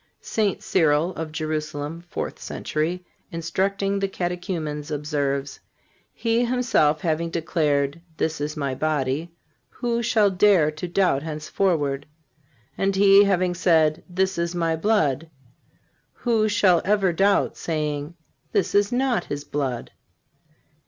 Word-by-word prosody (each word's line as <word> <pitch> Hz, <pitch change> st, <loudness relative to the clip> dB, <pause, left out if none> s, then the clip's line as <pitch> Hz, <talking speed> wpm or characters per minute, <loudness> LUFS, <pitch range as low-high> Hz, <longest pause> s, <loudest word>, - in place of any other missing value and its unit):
St. 210 Hz, -4 st, -1 dB
Cyril, 160 Hz, 0 st, +2 dB
of 160 Hz, -2 st, -5 dB
Jerusalem 155 Hz, 0 st, -4 dB
(fourth -, -, -4 dB
century), 170 Hz, +4 st, -3 dB, 0.3 s
instructing 195 Hz, +4 st, -1 dB
the 195 Hz, -, 0 dB
Catechumens, 175 Hz, -5 st, -4 dB
observes: 145 Hz, -2 st, -2 dB, 0.5 s
"He 230 Hz, +1 st, 0 dB
Himself 235 Hz, -12 st, +2 dB
having 165 Hz, 0 st, 0 dB
declared, 155 Hz, -3 st, 0 dB, 0.2 s
This 160 Hz, -2 st, -1 dB
is 150 Hz, +1 st, -3 dB
My 140 Hz, -3 st, -1 dB
body, 150 Hz, +2 st, -1 dB, 0.4 s
who 235 Hz, -1 st, -2 dB
shall 215 Hz, -3 st, +3 dB
dare 185 Hz, -5 st, +4 dB
to 155 Hz, +4 st, -6 dB
doubt 175 Hz, -6 st, +2 dB
henceforward? 155 Hz, -2 st, -1 dB, 0.7 s
And 195 Hz, 0 st, 0 dB
He 200 Hz, +1 st, +7 dB
having 185 Hz, -2 st, +1 dB
said, 160 Hz, -3 st, +2 dB
This 190 Hz, 0 st, 0 dB
is 170 Hz, +1 st, -1 dB
My 165 Hz, -2 st, +1 dB
blood, 160 Hz, -, +1 dB, 0.8 s
who 225 Hz, -3 st, +1 dB
shall 190 Hz, -5 st, +4 dB
ever 195 Hz, -3 st, +2 dB
doubt, 195 Hz, +4 st, +2 dB
saying: 150 Hz, -1 st, -3 dB, 0.4 s
This 200 Hz, -3 st, +1 dB
is 205 Hz, 0 st, +3 dB
not 250 Hz, -1 st, +1 dB
His 145 Hz, 0 st, -5 dB
blood? 135 Hz, -5 st, -3 dB
170 Hz, 120 wpm, -24 LUFS, 150-195 Hz, 0.8 s, He